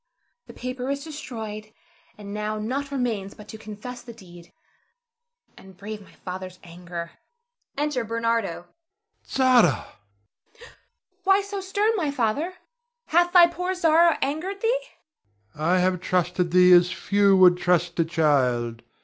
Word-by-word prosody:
The - - -11
paper 255 +1 -5
is 280 0 -2
destroyed, 220 -9 -7 0.5
and 200 -1 -9
now 210 0 -3
nought 260 +7 -3
remains 230 -8 -3
but 210 - -13
to 220 - -8
confess 220 +4 -8
the 235 - -11
deed, 175 -5 -15 1.0
and 190 -1 -16
brave 210 +2 -7
my 195 - -18
father's 185 0 -8
anger. 170 0 -8 0.7
[Enter 295 -4 -1
Bernardo. 230 -5 -1
Ber. 175 - -32 0.6
Zara! 255 -2 +5
Zara 175 - +4
[starts]. 100 - -16 0.6
Why 390 +1 +4
so 400 0 -5
stern, 405 +3 0
my 315 -6 0
father? 285 +7 -1 0.5
Hath 345 +2 +3
thy 355 -1 +8
poor 360 +2 -3
Zara 335 -2 +4
angered 345 +8 -3
thee? 475 +2 +1 0.7
Ber. 150 - -12
I 175 +4 +2
have 180 -1 +1
trusted 180 -1 0
thee 180 +1 +6
as 175 0 +5
few 200 -1 +2
would 180 -1 +6
trust 175 -1 +1
a - - +5
child. 130 -8 +1
215 Hz, 145 wpm, -24 LUFS, 180-285 Hz, 1.0 s, thy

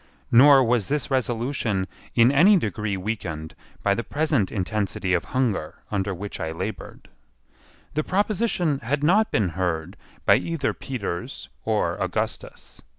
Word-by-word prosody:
Nor 135 +2 +8
was 115 -4 +1
this 145 0 -1
resolution 120 -5 0 0.3
in 120 +2 +6
any 185 +9 +6
degree 105 - -2
weakened 90 -6 -4 0.3
by 100 - +3
the 115 - -2
present 145 - 0
intensity 100 -1 -1
of 90 - +1
hunger 115 -12 -1 0.2
under 100 -1 -1
which 100 +2 -6
I 80 - -3
laboured. 95 +6 -6 0.9
The 155 - 0
proposition 190 -6 0
had 140 +5 -2
not 210 +8 +4
been 100 -5 +1
heard 85 0 -3 0.3
by - - +6
either 165 -5 -2
Peters 100 -9 -5 0.2
or - - 0
Augustus. - - -4
115 Hz, 135 wpm, -24 LUFS, 95-145 Hz, 0.9 s, Nor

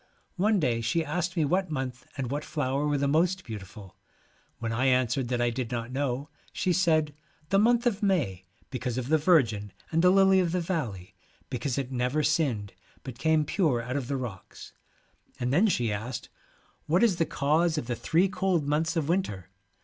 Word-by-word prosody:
One 205 +2 +3
day 120 -7 +1
she 140 +9 0
asked 175 +4 -2
me 160 - +3
what 185 +4 0
month 130 -4 -4
and 130 -3 -3
what 145 +1 -2
flower 140 -1 -1
were 145 -1 +1
the 140 0 +1
most 175 +6 +2
beautiful. 100 -2 -9 0.6
When 115 -1 -3
I 120 +4 0
answered 130 0 +2
that 120 0 -1
I 120 0 +2
did 120 -1 -3
not 120 0 -3
know, 135 0 -2 0.2
she 185 -2 0
said, 160 -5 +2 0.4
'the 195 - +4
month 240 +3 +3
of 225 -3 +1
May, 150 - 0 0.3
because 125 -1 -3
of 130 +1 -3
the 160 0 +4
Virgin, 115 - +2 0.2
and 165 0 +2
the 180 - +6
lily 190 0 +5
of 175 -2 0
the 180 - +1
valley, 120 - -3 0.4
because 125 +1 -2
it 135 -2 -3
never 125 +4 0
sinned, 135 -10 0 0.3
but 125 -3 -8
came 160 +2 +2
pure 150 - +1
out 125 +3 -4
of 135 -4 -2
the 140 0 -1
rocks/ 115 -7 -8 0.7
and 125 +1 -1
then 190 +9 +4
she 120 - +1
asked, 110 +5 -5 0.6
1 160 - +1
what 185 - +4
is 205 -7 +3
the 165 - +2
cause 155 +4 +1
of 135 - -2
the 120 0 -2
three 165 +10 +2
cold 185 -6 0
months 155 +3 0
of 160 -4 0
winter 130 - -1
145 Hz, 195 wpm, -28 LUFS, 120-170 Hz, 0.7 s, the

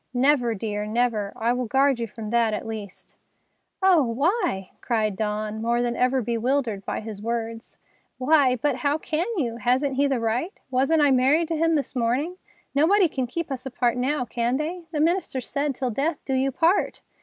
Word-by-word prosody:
"Never, 250 -3 +3
dear, 210 0 -3
never. 220 -3 0
I 235 +2 +1
will 250 -1 -2
guard 270 +1 +3
you 230 - -2
from 215 0 -7
that, 230 -2 +2
at - - -5
least." 215 -4 -8 0.7
"Oh, 370 -4 +6
why!" 275 - 0
cried 215 -4 0
Dawn, 215 +1 -2
more 235 +1 +1
than 240 -1 -1
ever 255 0 +1
bewildered 235 -2 -1
by - - -3
his 215 -2 -7
words. 230 +1 -4 0.4
"Why—but, 260 -1 +3
how 285 +3 +1
can 315 +2 -2
you? 235 -7 -1
Hasn't 260 +3 +1
he 285 +1 +3
the 270 -3 0
right? 230 - -1 0.2
Wasn't 275 +5 +3
I 285 - +5
married 275 +6 +3
to 330 - 0
him 330 +1 +2
this 285 -2 -2
morning? 255 +9 0 0.4
Nobody 355 +7 +4
can 260 -5 -3
keep 330 +4 -4
us 265 0 -4
apart 245 -1 0
now, 255 +2 0
can 240 +1 -1
they? 330 +4 -4
The 305 -2 -1
minister 330 -4 +1
said, 280 +3 -2
'Till 255 -1 -2
death 290 +7 -1
do 270 - -2
you 265 +1 +1
part! 335 +8 +1
255 Hz, 185 wpm, -24 LUFS, 230-295 Hz, 0.7 s, Oh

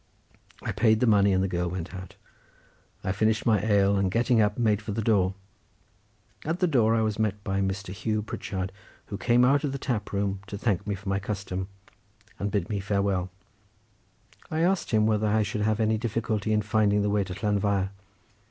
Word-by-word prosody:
I - - -2
paid 110 0 +3
the 125 - +3
money, 100 -3 +4
and 95 0 +2
the - - +1
girl 90 -1 -1
went 90 +1 -5
out. 95 -1 -8 0.9
I 95 - 0
finished 110 +3 +1
my 110 -4 +3
ale, 100 -2 +3
and 95 -1 +1
getting 115 +3 +3
up 105 0 +1
made 110 -3 +2
for 105 0 -5
the 110 - -1
door; 95 -4 +2 1.1
at 165 +4 -2
the 185 - +3
door 115 -9 +3
I 115 - +2
was 110 -1 -1
met 105 -2 -1
by 95 0 -1
Mr. 95 -1 -3
Hugh 110 +2 -2
Pritchard, 95 -3 -4 0.4
who 100 - -4
came 120 +5 +4
out 140 +2 +3
of 140 -2 -1
the - - -2
tap 120 -7 -3
room 100 -1 -1
to 100 - -5
thank 100 -2 -1
me 100 - -1
for 100 +1 -12
my 95 0 +1
custom, 100 -2 -4 0.7
and 100 0 -2
to 105 - +1
bid 85 - -7
me 105 -2 -2
farewell. 100 -2 0 1.2
I 160 +1 -1
asked 185 +2 +1
him 110 -2 +3
whether 110 -1 +2
I 110 +1 +2
should 105 +1 -3
have 110 +1 +1
any 110 0 +2
difficulty 110 -2 -1
in 105 0 +2
finding 105 -1 +2
the 105 - +1
way 105 -1 +2
to 95 -1 -6
Llanfair. 100 -1 0
105 Hz, 205 wpm, -27 LUFS, 95-110 Hz, 1.2 s, money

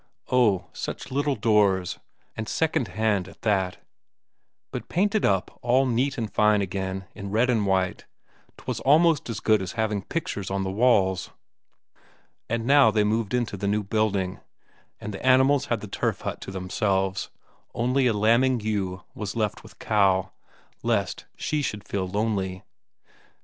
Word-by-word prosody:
Oh, 105 -8 +3
such - - -6
little 145 +1 0
doors, 100 -6 +2 0.4
and 110 -1 -5
secondhand 110 - 0
at 95 - -16
that, 95 -4 +1 0.9
but - - -6
painted 205 +3 +1
up 95 -2 0
all 125 +2 +3
neat 130 +3 0
and 110 -3 -4
fine 105 -1 +4
again 95 0 -3
in 100 -2 -7
red 115 +5 +2
and 110 -4 +1
white; 95 -1 0 0.5
'twas - - -4
almost 155 +1 +3
as 115 - -3
good 110 -2 +3
as 95 -1 -5
having 110 -3 -1
pictures 100 - -4
on 95 0 -1
the 95 - -2
walls. 100 -4 +2 1.2
And 115 0 -1
now 140 -2 +6
they 105 -1 +2
moved 110 +2 0
into 120 -4 -1
the 100 +1 -3
new 105 +1 +1
building, 100 -3 0 0.6
and 105 - -6
the 95 - -7
animals 130 +2 +4
had 115 -3 -1
the 105 - -7
turf - - -2
hut - - -5
to - - -7
themselves, 95 +1 -1 0.5
only 125 +3 +2
a 115 - +2
lambing 115 +5 +3
ewe 100 -4 -2
was 105 -1 -5
left 110 -2 -1
with - - -16
Cow, 95 -3 +2 0.5
lest - - -1
she 150 -1 -1
should 105 -7 -4
feel 95 -2 -2
lonely. 95 -2 -2
105 Hz, 155 wpm, -25 LUFS, 95-120 Hz, 1.2 s, now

